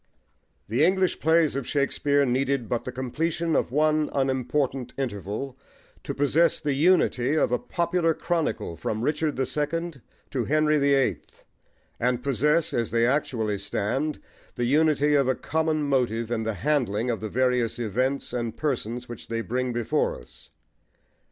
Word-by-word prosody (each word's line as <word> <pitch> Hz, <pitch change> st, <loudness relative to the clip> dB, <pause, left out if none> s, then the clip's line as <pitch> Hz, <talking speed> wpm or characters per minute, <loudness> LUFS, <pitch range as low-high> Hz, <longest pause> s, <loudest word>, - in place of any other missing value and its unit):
THE 120 Hz, +7 st, +1 dB
English 185 Hz, +1 st, +2 dB
plays 160 Hz, -2 st, +3 dB
of 140 Hz, -3 st, -3 dB
Shakespeare 140 Hz, 0 st, +1 dB
needed 130 Hz, -1 st, 0 dB
but 120 Hz, +1 st, -2 dB
the 125 Hz, -, -4 dB
completion 155 Hz, +6 st, -1 dB
of -, -, +1 dB
one 155 Hz, +2 st, +2 dB
unimportant 135 Hz, -1 st, -1 dB
interval 120 Hz, +2 st, -4 dB, 0.4 s
to -, -, -4 dB
possess 155 Hz, +4 st, +3 dB
the 145 Hz, -, -1 dB
unity 145 Hz, -4 st, +3 dB
of 155 Hz, -, +2 dB
a 125 Hz, -, +1 dB
popular 170 Hz, -1 st, 0 dB
chronicle 165 Hz, -, -2 dB
from 110 Hz, +7 st, -3 dB
Richard 150 Hz, +2 st, 0 dB
the 130 Hz, -, 0 dB
Second 150 Hz, +1 st, -3 dB, 0.3 s
to 125 Hz, -4 st, -1 dB
Henry 155 Hz, 0 st, +2 dB
the 140 Hz, 0 st, +3 dB
Eighth, 125 Hz, -, -2 dB, 0.6 s
and 125 Hz, 0 st, 0 dB
possess, 150 Hz, +4 st, +1 dB
as 115 Hz, -2 st, 0 dB
they 115 Hz, 0 st, +2 dB
actually 115 Hz, -6 st, 0 dB
stand, 135 Hz, +10 st, -2 dB, 0.4 s
the 120 Hz, -, -1 dB
unity 150 Hz, +2 st, +3 dB
of 140 Hz, -3 st, +3 dB
a 130 Hz, -, +2 dB
common 160 Hz, -1 st, -1 dB
motive 120 Hz, -5 st, 0 dB
in 115 Hz, -2 st, 0 dB
the 110 Hz, -1 st, -2 dB
handling 125 Hz, -2 st, 0 dB
of 115 Hz, -, -3 dB
the 110 Hz, -, -4 dB
various 125 Hz, -1 st, +1 dB
events 125 Hz, +4 st, -1 dB
and 120 Hz, -2 st, -3 dB
persons 125 Hz, -4 st, -2 dB
which 120 Hz, -2 st, -9 dB
they 115 Hz, 0 st, -2 dB
bring 125 Hz, +2 st, -2 dB
before 120 Hz, -2 st, 0 dB
us. -, -, -16 dB
135 Hz, 155 wpm, -26 LUFS, 120-150 Hz, 0.6 s, plays